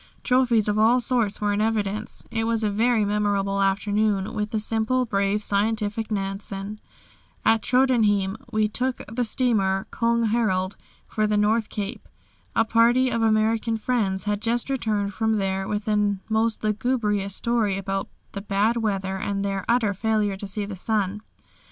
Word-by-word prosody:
Trophies 245 Hz, -4 st, +3 dB
of 210 Hz, 0 st, +1 dB
all 230 Hz, +3 st, +5 dB
sorts 235 Hz, -5 st, 0 dB
were 205 Hz, -1 st, 0 dB
in 205 Hz, -, 0 dB
evidence. 215 Hz, -1 st, -2 dB
It 225 Hz, -1 st, -1 dB
was 225 Hz, -1 st, 0 dB
a 210 Hz, -, +1 dB
very 225 Hz, +1 st, +2 dB
memorable 200 Hz, -1 st, 0 dB
afternoon 205 Hz, +1 st, +1 dB
with 210 Hz, -1 st, -2 dB
the 220 Hz, -1 st, -1 dB
simple, 225 Hz, +4 st, 0 dB
brave, 200 Hz, -1 st, 0 dB
scientific 215 Hz, +1 st, 0 dB
Nansen. 195 Hz, 0 st, -3 dB, 0.7 s
At 225 Hz, -1 st, +4 dB
Tröndhjem 220 Hz, -6 st, +2 dB, 0.2 s
we 215 Hz, 0 st, +2 dB
took 250 Hz, +4 st, -2 dB
the 245 Hz, +2 st, 0 dB
steamer 215 Hz, -6 st, +1 dB
"Köng 230 Hz, -1 st, +1 dB
Harald" 195 Hz, -4 st, 0 dB, 0.3 s
for 215 Hz, 0 st, -1 dB
the 210 Hz, 0 st, +1 dB
North 215 Hz, +2 st, +2 dB
Cape. 200 Hz, -, -5 dB, 0.5 s
A 225 Hz, -, +3 dB
party 240 Hz, +3 st, +3 dB
of 230 Hz, -1 st, 0 dB
American 225 Hz, +1 st, +2 dB
friends 215 Hz, -5 st, -1 dB
had 210 Hz, 0 st, -1 dB
just 235 Hz, +3 st, 0 dB
returned 210 Hz, -6 st, -1 dB
from 220 Hz, +2 st, 0 dB
there 195 Hz, -1 st, -1 dB
with 210 Hz, 0 st, -2 dB
the 210 Hz, -2 st, +1 dB
most 220 Hz, 0 st, 0 dB
lugubrious 210 Hz, -3 st, 0 dB
story 225 Hz, -5 st, 0 dB
about 195 Hz, 0 st, -3 dB, 0.2 s
the 200 Hz, -, -6 dB
bad 205 Hz, +3 st, +1 dB
weather 195 Hz, -4 st, -1 dB
and 200 Hz, +1 st, -2 dB
their 195 Hz, -1 st, -2 dB
utter 230 Hz, -4 st, +2 dB
failure 210 Hz, 0 st, 0 dB
to 195 Hz, +1 st, -7 dB
see 205 Hz, +1 st, -3 dB
the 200 Hz, -1 st, -6 dB
sun. 205 Hz, +1 st, -1 dB
215 Hz, 160 wpm, -24 LUFS, 200-225 Hz, 0.7 s, all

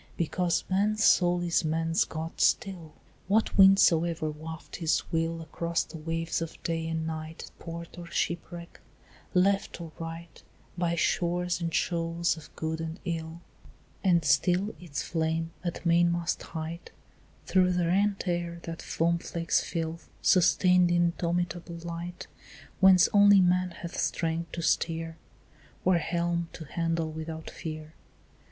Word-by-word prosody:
Because 175 Hz, +1 st, 0 dB
man's 210 Hz, +3 st, +1 dB
soul 175 Hz, -3 st, +4 dB
is 170 Hz, 0 st, +1 dB
man's 165 Hz, +1 st, +1 dB
God 160 Hz, +1 st, -5 dB
still, 185 Hz, -8 st, +1 dB, 0.4 s
What 215 Hz, +3 st, +2 dB
wind 195 Hz, 0 st, +8 dB
soever 165 Hz, -3 st, +3 dB
waft 160 Hz, +1 st, -8 dB
his 160 Hz, -3 st, +1 dB
will 165 Hz, 0 st, -1 dB
Across 170 Hz, +1 st, -1 dB
the 165 Hz, -, -10 dB
waves 165 Hz, +1 st, -2 dB
of 165 Hz, -, -5 dB
day 165 Hz, -1 st, -2 dB
and 160 Hz, 0 st, -2 dB
night 160 Hz, 0 st, -5 dB
To -, -, -9 dB
port 170 Hz, +1 st, -8 dB
or 170 Hz, -, -8 dB
shipwreck, 170 Hz, +1 st, -3 dB, 0.6 s
left 195 Hz, +1 st, +2 dB
or 165 Hz, -2 st, -7 dB
right, 165 Hz, +1 st, -8 dB, 0.3 s
By 175 Hz, -1 st, 0 dB
shores 175 Hz, +1 st, 0 dB
and 165 Hz, 0 st, -1 dB
shoals 170 Hz, 0 st, 0 dB
of 160 Hz, -3 st, -12 dB
good 160 Hz, 0 st, -3 dB
and 165 Hz, +2 st, -5 dB
ill; 165 Hz, -1 st, -4 dB, 0.6 s
And 170 Hz, -5 st, +3 dB
still 180 Hz, +8 st, +2 dB
its 165 Hz, -5 st, -5 dB
flame 165 Hz, 0 st, -1 dB
at 175 Hz, 0 st, -4 dB
mainmast 170 Hz, 0 st, +2 dB
height 165 Hz, +1 st, -6 dB, 0.6 s
Through 185 Hz, -1 st, +3 dB
the 175 Hz, -1 st, +1 dB
rent 195 Hz, +3 st, +1 dB
air 170 Hz, -1 st, -2 dB
that 165 Hz, 0 st, -6 dB
foam 170 Hz, +1 st, 0 dB
flakes 165 Hz, 0 st, 0 dB
fill 165 Hz, 0 st, -3 dB, 0.2 s
Sustains 180 Hz, 0 st, +4 dB
the 175 Hz, -, +2 dB
indomitable 175 Hz, 0 st, -1 dB
light 170 Hz, +1 st, -6 dB, 0.5 s
Whence 190 Hz, -2 st, +7 dB
only 205 Hz, -1 st, +7 dB
man 180 Hz, 0 st, +3 dB
hath 170 Hz, 0 st, -7 dB
strength 165 Hz, 0 st, -1 dB
to 170 Hz, -, -4 dB
steer 165 Hz, 0 st, 0 dB, 0.7 s
Or 180 Hz, -2 st, +4 dB
helm 170 Hz, 0 st, -1 dB
to 160 Hz, -, -8 dB
handle 165 Hz, +1 st, -1 dB
without 160 Hz, 0 st, -6 dB
fear. 155 Hz, -1 st, -7 dB
170 Hz, 140 wpm, -28 LUFS, 165-175 Hz, 0.7 s, wind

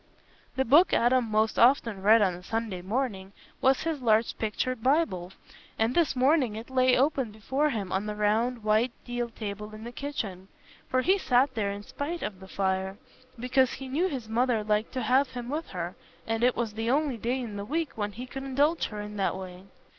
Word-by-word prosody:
The 265 Hz, -, +1 dB
book 305 Hz, +9 st, +5 dB
Adam 245 Hz, +1 st, +3 dB
most 215 Hz, +1 st, +1 dB
often 230 Hz, -5 st, +4 dB
read 215 Hz, +2 st, +6 dB
on 185 Hz, -2 st, +2 dB
a 175 Hz, -, -9 dB
Sunday 215 Hz, -1 st, -3 dB
morning 200 Hz, -2 st, -3 dB, 0.3 s
was 265 Hz, 0 st, +3 dB
his 320 Hz, -4 st, -2 dB
large 225 Hz, -1 st, +2 dB
pictured 225 Hz, +3 st, -2 dB
Bible, 255 Hz, -, +1 dB, 0.5 s
and 225 Hz, +2 st, +1 dB
this 335 Hz, -3 st, +2 dB
morning 260 Hz, -3 st, +3 dB
it 225 Hz, +4 st, -8 dB
lay 255 Hz, -1 st, +4 dB
open 270 Hz, -2 st, +1 dB
before 265 Hz, +8 st, -1 dB
him 205 Hz, -8 st, -3 dB
on 195 Hz, +2 st, -1 dB
the 210 Hz, -, -3 dB
round 220 Hz, +3 st, +1 dB
white 215 Hz, +3 st, +2 dB
deal 245 Hz, -1 st, -3 dB
table 210 Hz, -1 st, -6 dB
in 215 Hz, -, -10 dB
the 235 Hz, -, -6 dB
kitchen; 220 Hz, -9 st, -5 dB, 0.4 s
for 255 Hz, -, +2 dB
he 385 Hz, +5 st, +3 dB
sat 260 Hz, -3 st, +3 dB
there 210 Hz, -4 st, -1 dB
in 200 Hz, +1 st, -5 dB
spite 320 Hz, +9 st, -5 dB
of 200 Hz, -3 st, -4 dB
the 190 Hz, -, -12 dB
fire, 190 Hz, 0 st, -1 dB, 0.4 s
because 255 Hz, +1 st, +2 dB
he 270 Hz, -, -7 dB
knew 310 Hz, +8 st, +1 dB
his 260 Hz, -10 st, -5 dB
mother 230 Hz, 0 st, +1 dB
liked 210 Hz, +1 st, 0 dB
to 255 Hz, -1 st, -2 dB
have 260 Hz, +5 st, +3 dB
him 245 Hz, -1 st, -6 dB
with 310 Hz, +4 st, -3 dB
her, 175 Hz, -1 st, -5 dB, 0.3 s
and 225 Hz, +1 st, -1 dB
it 250 Hz, 0 st, +4 dB
was 225 Hz, -3 st, -2 dB
the 225 Hz, +2 st, -2 dB
only 280 Hz, -1 st, +1 dB
day 240 Hz, +4 st, -1 dB
in 230 Hz, -5 st, -5 dB
the 200 Hz, -, -4 dB
week 315 Hz, +7 st, -2 dB
when 205 Hz, -1 st, -3 dB
he 245 Hz, +4 st, -7 dB
could 270 Hz, +1 st, -7 dB
indulge 285 Hz, +5 st, +1 dB
her 210 Hz, -1 st, -6 dB
in 210 Hz, 0 st, -7 dB
that 195 Hz, -1 st, 0 dB
way. 185 Hz, 0 st, -9 dB
230 Hz, 205 wpm, -28 LUFS, 210-265 Hz, 0.5 s, read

